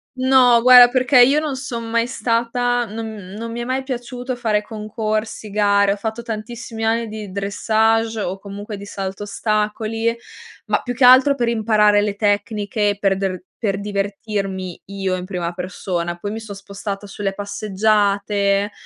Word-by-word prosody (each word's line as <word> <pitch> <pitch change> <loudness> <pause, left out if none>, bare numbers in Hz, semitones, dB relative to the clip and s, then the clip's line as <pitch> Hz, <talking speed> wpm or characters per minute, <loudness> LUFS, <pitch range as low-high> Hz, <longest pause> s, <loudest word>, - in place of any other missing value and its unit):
No, 255 -2 +5
guarda, 250 0 +9
perché 255 +1 +4
io 275 +5 +5
non 305 -3 -3
son 245 -3 -5
mai 230 0 +1
stata, 245 0 0
non 220 0 -6 0.2
non 230 +1 -5
mi 235 +1 -4
è - - -2
mai 260 +2 -2
piaciuto 250 0 -5
fare 220 -4 0
concorsi, 215 0 -4
gare. 200 -1 +3
Ho - - -4
fatto 220 +3 -5
tantissimi 225 0 -6
anni 230 +1 +1
di 215 -2 -7
dressage 220 +3 +1
o 190 -1 -3
comunque 205 +2 -7
di 200 0 -9
salto 195 0 -5
ostacoli, 215 +2 -1 0.5
ma - - 0
più 245 - -4
che 250 +1 +3
altro 260 +3 +7
per 240 -3 -1
imparare 215 -2 +3
le 205 -1 -1
tecniche 205 0 0
per 195 -1 +2
der 190 -2 -3 0.2
per 195 -3 -1
divertirmi 200 -2 -3
io, 195 -1 -2
in 180 - -6
prima 180 -3 -3
persona, 175 -1 -4
poi 205 +4 -5
mi 220 - -4
son 220 -2 -8
spostata 200 +1 -6
sulle 195 0 -3
passeggiate, 200 0 0
215 Hz, 160 wpm, -20 LUFS, 200-235 Hz, 0.5 s, guarda